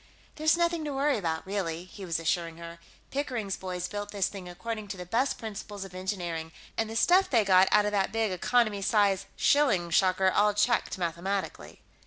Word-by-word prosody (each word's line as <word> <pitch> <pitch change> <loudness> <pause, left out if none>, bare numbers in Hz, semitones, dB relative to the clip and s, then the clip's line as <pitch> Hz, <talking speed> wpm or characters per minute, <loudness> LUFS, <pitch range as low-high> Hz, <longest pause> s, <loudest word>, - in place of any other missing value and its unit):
"There's 315 +2 +3
nothing 340 -1 +1
to 290 - -3
worry 275 -3 +1
about, 160 -4 -2
really," 180 -4 -3
he 190 +1 -10
was 165 -2 -1
assuring 165 0 -1
her. 170 0 -9 0.3
"Pickering's 245 -8 -2
boys 180 -1 -4
built 205 0 -5
this 200 -2 0
thing 190 -3 -8
according 215 +4 -5
to 195 - -6
the 180 - -7
best 235 +9 0
principles 205 -2 -7
of 190 - -12
engineering, 175 -4 -4 0.2
and 225 -1 -1
the 225 - -6
stuff 365 +10 +4
they 230 -6 +3
got 190 -1 +6
out 210 -1 +5
of 210 - 0
that 195 -2 +1
big 225 -2 0
economy 215 +2 +1
size 200 -1 +2
shilling 215 -13 +3
shocker 185 +1 +3
all 205 +1 +3
checked 210 +1 +1
mathematically...." 185 +3 -3
200 Hz, 190 wpm, -28 LUFS, 180-225 Hz, 0.3 s, got